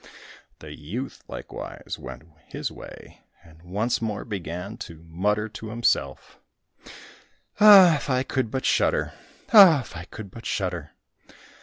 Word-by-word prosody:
The 75 Hz, -1 st, -9 dB
youth 110 Hz, -, -7 dB
likewise -, -, -8 dB
went -, -, -9 dB, 0.2 s
his -, -, -5 dB
way, -, -, -13 dB, 0.2 s
and 80 Hz, -1 st, -19 dB
once 110 Hz, +8 st, -2 dB
more 105 Hz, -3 st, -3 dB
began 95 Hz, 0 st, -6 dB
to 85 Hz, -8 st, -10 dB
mutter 105 Hz, +6 st, -1 dB
to 110 Hz, +1 st, -9 dB
himself, 115 Hz, +2 st, -1 dB, 1.2 s
"Ah, 195 Hz, -6 st, +8 dB
if 145 Hz, -, -7 dB
I 130 Hz, 0 st, +1 dB
could 130 Hz, -3 st, -2 dB
but 130 Hz, +3 st, -4 dB
shudder! -, -, +1 dB, 0.4 s
Ah, 185 Hz, -9 st, +9 dB
if -, -, -13 dB
I 85 Hz, +1 st, -7 dB
could 100 Hz, 0 st, -10 dB
but 115 Hz, -, -9 dB
shudder!" 90 Hz, -6 st, -3 dB
105 Hz, 135 wpm, -24 LUFS, 85-130 Hz, 1.2 s, Ah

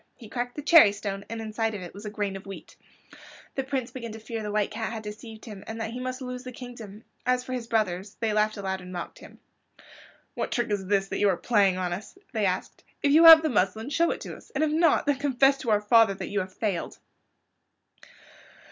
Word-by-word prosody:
He 225 Hz, -4 st, -13 dB
cracked 245 Hz, 0 st, -4 dB
the 295 Hz, -, -6 dB
cherry 295 Hz, -9 st, +7 dB
stone 200 Hz, -1 st, -5 dB
and 230 Hz, 0 st, -5 dB
inside 220 Hz, 0 st, -2 dB
of 190 Hz, -, -6 dB
it 175 Hz, -, -9 dB
was 205 Hz, +2 st, -10 dB
a -, -, -3 dB
grain 205 Hz, -2 st, -3 dB
of 195 Hz, 0 st, -9 dB
wheat. 195 Hz, -, -10 dB, 0.8 s
The 270 Hz, -, -2 dB
Prince 260 Hz, -2 st, -3 dB
began 235 Hz, -3 st, -7 dB
to 220 Hz, -, -8 dB
fear 225 Hz, +1 st, -5 dB
the 210 Hz, -1 st, -4 dB
White 210 Hz, -1 st, 0 dB
Cat 220 Hz, 0 st, -3 dB
had 220 Hz, -1 st, -6 dB
deceived 220 Hz, +1 st, -9 dB
him, 210 Hz, -4 st, -9 dB
and 225 Hz, +1 st, -6 dB
that 225 Hz, 0 st, -3 dB
he 245 Hz, -, -6 dB
must 255 Hz, +1 st, -4 dB
lose 250 Hz, 0 st, -6 dB
the 255 Hz, -, -7 dB
kingdom. 235 Hz, -4 st, -10 dB, 0.2 s
As 250 Hz, 0 st, +1 dB
for 255 Hz, -, -6 dB
his 245 Hz, -2 st, -4 dB
brothers, 205 Hz, -4 st, -1 dB
they 225 Hz, -2 st, 0 dB
laughed 215 Hz, +1 st, +1 dB
aloud 190 Hz, -1 st, -3 dB
and 180 Hz, 0 st, -10 dB
mocked 175 Hz, -2 st, -7 dB
at -, -, -11 dB
him. -, -, -20 dB, 0.9 s
"What -, -, -3 dB
trick 240 Hz, -3 st, -1 dB
is 195 Hz, -2 st, -2 dB
this 195 Hz, -1 st, +1 dB
that -, -, -3 dB
you 205 Hz, -, +4 dB
are 185 Hz, -, +1 dB
playing 200 Hz, -2 st, +2 dB
on 180 Hz, -1 st, -2 dB
us?" 205 Hz, -, -8 dB, 0.2 s
they 215 Hz, -3 st, +1 dB
asked. 185 Hz, 0 st, -4 dB, 0.2 s
"If 285 Hz, -, +3 dB
you 320 Hz, +3 st, +7 dB
have 325 Hz, -1 st, +11 dB
the 315 Hz, -, +1 dB
muslin 220 Hz, +3 st, 0 dB
show 335 Hz, +3 st, +2 dB
it -, -, -3 dB
to -, -, -7 dB
us, -, -, -16 dB
and 295 Hz, -, +1 dB
if 310 Hz, -, +1 dB
not 325 Hz, 0 st, +3 dB
then 285 Hz, -2 st, +1 dB
confess 275 Hz, -1 st, +3 dB
to 250 Hz, -, -4 dB
our 210 Hz, -1 st, +3 dB
father 220 Hz, -1 st, +5 dB
that -, -, -6 dB
you 205 Hz, -, -1 dB
have 185 Hz, -1 st, -4 dB
failed." 195 Hz, -3 st, -3 dB
220 Hz, 245 wpm, -27 LUFS, 200-250 Hz, 0.9 s, have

